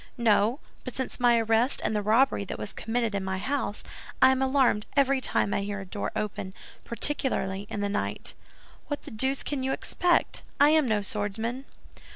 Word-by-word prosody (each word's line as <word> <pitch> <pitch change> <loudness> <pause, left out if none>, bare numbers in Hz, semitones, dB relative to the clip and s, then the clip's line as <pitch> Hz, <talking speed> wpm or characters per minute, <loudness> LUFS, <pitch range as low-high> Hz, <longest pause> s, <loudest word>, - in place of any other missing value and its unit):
"No; 230 +2 +3 0.2
but 255 - -7
since 260 - -3
my 240 -1 +5
arrest 225 +3 +2
and 215 - +1
the 210 - +1
robbery 220 +2 +3
that - - -5
was 205 - -6
committed 230 -1 -1
in 200 -1 -1
my 190 0 -2
house, 255 0 -2 0.4
I 260 - +7
am 265 0 0
alarmed 265 -5 +2
every 275 -1 +3
time 200 - +1
I - - 0
hear 205 0 -4
a 195 - -7
door 200 +2 -4
open, 195 -2 -4 0.3
particularly 210 -6 -1
in 205 - -3
the 205 - +1
night. 205 +1 -3 0.5
What 290 - -4
the - - -9
deuce 265 +5 0
can 285 -2 -2
you 265 +1 -1
expect? 350 -1 +1 0.2
I 290 +1 +7
am 310 -3 +4
no 215 -3 +1
swordsman." 220 +6 -3
230 Hz, 190 wpm, -27 LUFS, 205-265 Hz, 0.5 s, I